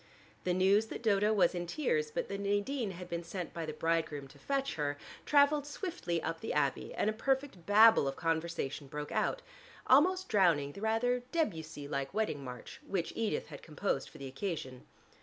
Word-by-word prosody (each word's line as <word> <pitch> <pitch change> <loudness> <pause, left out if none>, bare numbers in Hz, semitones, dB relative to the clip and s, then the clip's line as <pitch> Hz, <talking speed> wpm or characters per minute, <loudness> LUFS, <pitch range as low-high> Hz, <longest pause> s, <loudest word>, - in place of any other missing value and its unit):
The 180 - +2
news 195 +4 +4
that 235 - -7
Dodo 210 -1 +3
was 190 -5 +4
in 175 -1 -3
tears, 455 - 0
but - - -3
that 195 - -4
Nadine 205 +4 0
had 180 -1 -7
been 170 0 -3
sent 175 +1 -5
by 165 -2 -4
the - - -2
bridegroom 155 -3 -1
to - - -17
fetch 275 0 -1
her, 145 -1 -2 0.3
traveled 290 0 +4
swiftly 290 - -3
up 165 0 -3
the - - -3
Abbey, 140 -3 0
and - - 0
a 215 - +2
perfect 265 -5 -1
babel 215 -6 +7
of 135 - -2
conversation 160 -3 -2
broke 150 +2 -6
out, - - 0 0.4
almost 365 +8 +4
drowning 170 -9 +3
the 200 - -10
rather 235 +3 +1
Debussy 160 - -2
like 140 -1 -3
wedding 210 -10 -1
march 125 -2 -8
which 180 -4 -2
Edith 225 -2 -1
had - - -9
composed 165 +5 -2
for - - -14
the 140 - -7
occasion. 135 -3 -5
190 Hz, 185 wpm, -33 LUFS, 160-240 Hz, 0.4 s, babel